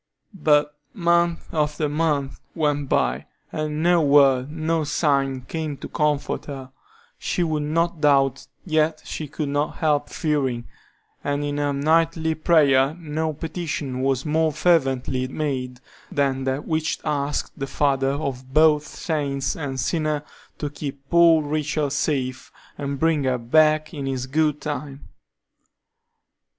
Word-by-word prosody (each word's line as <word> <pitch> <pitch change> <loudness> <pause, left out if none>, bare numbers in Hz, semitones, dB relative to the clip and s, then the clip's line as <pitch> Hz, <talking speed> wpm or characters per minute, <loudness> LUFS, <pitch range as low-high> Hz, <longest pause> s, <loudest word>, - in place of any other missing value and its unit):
But 150 -4 +2 0.2
month 170 -2 +1
after 150 -1 0
month 145 -3 -1 0.2
went 145 -3 0
by, 65 +1 0 0.2
and 155 0 -2
no 175 0 +4
word, 140 -3 +4
no 160 0 -1
sign 140 -3 +1
came 155 +2 -4
to - - -7
comfort 150 -1 -1
her. 135 -2 -8 0.5
She 175 - -1
would 155 -2 -1
not 165 +2 0
doubt, 135 -2 +3 0.2
yet 155 -2 +1
she 155 - -5
could 150 0 -4
not 145 +1 -1
help 150 -3 +1
fearing, 135 -7 -1 0.6
and 145 0 -1
in 145 0 -2
her 145 0 +1
nightly 160 +3 +2
prayer 150 -3 +3
no 160 0 -2
petition 150 -4 -4
was 135 +1 0
more 160 +1 +2
fervently 135 -6 +1
made 130 -3 -3 0.3
than 135 -2 0
that 135 +2 -2
which 160 -1 0
asked 145 0 -2
the 135 - -2
Father 135 -1 +1
of 135 -3 -4
both 150 0 +4
saint 140 -6 -2
and 135 -4 -4
sinner 155 -1 0 0.3
to 145 -1 -4
keep 140 -2 -7
poor 170 -2 +6
Rachel 150 -1 -1
safe, 135 -3 -2 0.2
and 140 -1 -4
bring 160 -3 +2
her 130 -1 +1
back 155 +6 +3
in 140 -3 -4
his 130 -1 -2
good 150 +2 0
time. 145 -1 -6
150 Hz, 135 wpm, -23 LUFS, 135-155 Hz, 0.6 s, poor